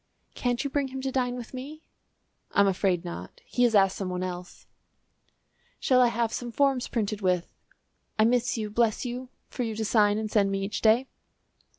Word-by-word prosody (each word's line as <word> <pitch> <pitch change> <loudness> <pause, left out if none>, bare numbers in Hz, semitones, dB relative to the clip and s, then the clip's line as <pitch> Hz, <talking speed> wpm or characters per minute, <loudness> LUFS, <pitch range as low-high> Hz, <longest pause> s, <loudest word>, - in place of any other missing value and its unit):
"Can't 245 +1 -1
you 280 - -2
bring 280 -1 0
him 265 0 -6
to 265 0 -2
dine 250 -2 0
with 245 0 -8
me?" 290 +5 -8 0.7
"I'm 200 - +5
afraid 185 -2 +1
not; 170 - -7
he 245 - -2
has 230 -2 +2
asked 195 -1 +4
some 190 -2 -3
one 180 0 -2
else." 180 -1 -7 1.1
"Shall 255 -1 +4
I 245 - +6
have 235 -1 0
some 240 -1 -4
forms 270 -1 +2
printed 215 -2 -2
with 180 -2 0 0.6
'I 215 - +5
miss 245 +1 +2
you, 215 -2 -3
bless 230 +2 +1
you,' 250 +1 -5 0.2
for - - -5
you 225 -2 -2
to 220 0 -2
sign 210 -1 +3
and 215 -1 -3
send 200 -2 +3
me 195 0 -1
each 200 +1 -3
day." 225 +4 +4
225 Hz, 195 wpm, -27 LUFS, 200-250 Hz, 1.1 s, I